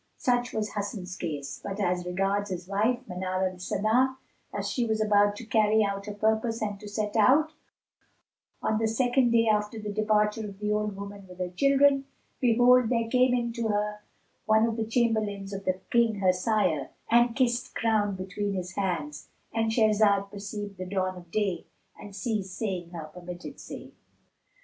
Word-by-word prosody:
Such 245 -3 +1
was 215 -1 -3
Hasan's 200 -3 -4
case; 145 -6 -5
but 200 +1 -5
as 180 -2 0
regards 195 +3 0
his 180 -1 -5
wife 230 +6 0
Manar 185 0 -1
al 185 0 -8
Sana, 230 +8 +1 0.3
as - - -3
she 245 - 0
was 220 -1 0
about 205 -1 +3
to 230 - -8
carry 215 0 +3
out 200 0 -3
her 210 - -4
purpose 220 +2 +1
and 205 -2 -3
to 210 - -9
set 210 0 -3
out, 280 +8 +5 1.1
on 215 - +1
the 225 - +1
second 245 +2 +2
day 230 -1 +3
after 210 +1 +1
the 210 -1 -5
departure 210 0 +1
of 195 - -12
the 210 +1 -2
old 210 -1 0
woman 200 0 -8
with 180 -1 -12
her 180 -1 -3
children, 275 +5 +4 0.3
behold, 245 0 +5
there 230 -2 +1
came 255 0 +4
in 235 -1 -1
to 235 -1 -2
her 210 0 -1 0.5
one 220 +1 +5
of 230 -1 -1
the 225 -1 -1
chamberlains 215 -4 0
of 195 0 -6
the 185 0 0
King 235 -2 +3
her 190 -2 +3
sire, 180 - 0 0.2
and 240 0 +4
kissed 250 -2 0
ground 210 -3 +1
between 200 +2 -3
his 180 -1 -4
hands,—And 185 +5 -3
Shahrazad 210 -3 +3
perceived 205 -1 -6
the 185 - -4
dawn 185 -1 -1
of 175 -2 -12
day 190 -3 -1 0.3
and 205 -2 -11
ceased 200 -5 -3
saying 185 -6 -3
her 170 -2 -7
permitted 180 0 -8
say. - - -9
210 Hz, 175 wpm, -28 LUFS, 195-225 Hz, 1.1 s, out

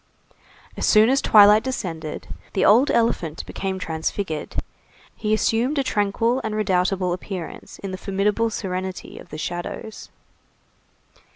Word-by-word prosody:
As - - -1
soon 215 +1 +6
as 275 - +2
twilight 210 0 +7
descended, 165 -12 -5 0.3
the 195 - +2
old 240 +7 +6
elephant 170 -9 0
became 190 -1 -4
transfigured; 160 -1 -3 0.6
he 215 - -3
assumed 230 +6 +1
a 275 - +2
tranquil 230 +1 0
and 220 -1 -3
redoubtable 185 -2 +1
appearance 180 -1 -7
in 195 - -6
the 185 - -6
formidable 205 +3 0
serenity 185 -3 -5
of - - -13
the - - -7
shadows. 175 +6 -6
200 Hz, 125 wpm, -23 LUFS, 180-220 Hz, 0.6 s, twilight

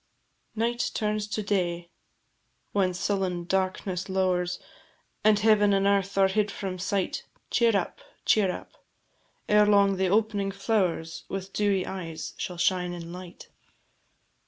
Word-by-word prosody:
Night 235 +2 0
turns 210 -1 -1
to 215 0 -3
day: 175 -4 -1 0.8
When 185 -3 +1
sullen 185 -2 -1
darkness 185 0 -1
lowers, 180 -2 +1 0.7
And 215 0 +5
heaven 210 -1 +4
and 195 0 +2
earth 200 -1 +1
are 195 -1 +6
hid 210 +2 +1
from 190 -2 -5
sight, 195 0 -1 0.3
Cheer 230 -3 +4
up, 185 - -3 0.3
cheer 205 -3 +4
up; - - -8 0.8
Ere 210 0 +5
long 200 -2 +4
the 190 0 +2
opening 205 0 +1
flowers, 190 -5 -1
With 195 0 -5
dewy 200 -3 +1
eyes, 165 -4 -6
shall 180 - -4
shine 180 0 +1
in 170 -1 -7
light. 180 -1 -10
195 Hz, 135 wpm, -27 LUFS, 180-205 Hz, 0.8 s, are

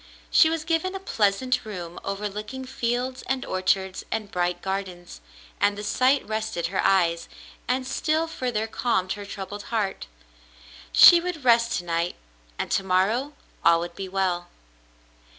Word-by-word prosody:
She 315 - +6
was 325 -1 -2
given 335 +4 0
a - - -3
pleasant 240 - +1
room 175 -5 -7
overlooking 210 +6 -5
fields 250 +1 -2
and 265 -1 -1
orchards 190 0 0
and 215 -2 -3
bright 175 0 -1
gardens, 185 - -5 0.4
and 205 0 +2
the 210 - -5
sight 255 +5 +2
rested 215 -6 -2
her - - +1
eyes, 175 -4 +2 0.4
and 255 +1 0
still 310 +4 0
further 245 -8 -2
calmed 220 -5 0
her 205 -1 -8
troubled 200 +1 -6
heart. 205 - -2 0.8
She 345 - +9
would 340 -6 -5
rest 235 -1 +4
to 180 - -1
night, 170 0 -1 0.4
and - - -3
to 195 - +1
morrow 205 +10 +1 0.3
all 170 0 +5
would 170 0 -5
be 195 -1 -6
well. 185 -2 -1
205 Hz, 150 wpm, -25 LUFS, 185-255 Hz, 0.8 s, She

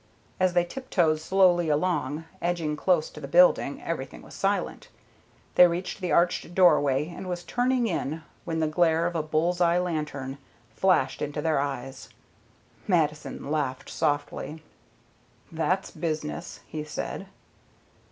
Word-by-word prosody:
As 185 -1 +3
they 175 -1 +3
tiptoed 175 -8 0
slowly 175 -1 +3
along, 155 -1 0 0.2
edging 170 -3 -1
close 165 0 +2
to - - -10
the - - -6
building, - - +4
everything - - -5
was - - -13
silent. - - -1 0.7
They 180 - +8
reached 180 +3 -4
the 180 -3 -2
arched 175 +1 +1
doorway, 150 -5 +4
and 185 +2 -7
were 180 - 0
turning 245 +7 0
in 160 -5 -2 0.2
when 160 -1 -2
the 160 - +2
glare 165 +1 +2
of 175 0 -2
a 160 - +1
bull's 160 +3 0
eye 170 0 +4
lantern 150 -6 -3 0.4
flashed 180 -7 +2
into 150 +1 -3
their 155 -1 +1
eyes. 135 -1 -4 0.8
Mattison 150 -5 0
laughed 140 -4 -2
softly. 150 +1 -2 0.9
"That's 180 +4 -1
business," 155 - -4
he 155 -1 -5
said. 150 - -5
165 Hz, 135 wpm, -27 LUFS, 150-180 Hz, 0.9 s, They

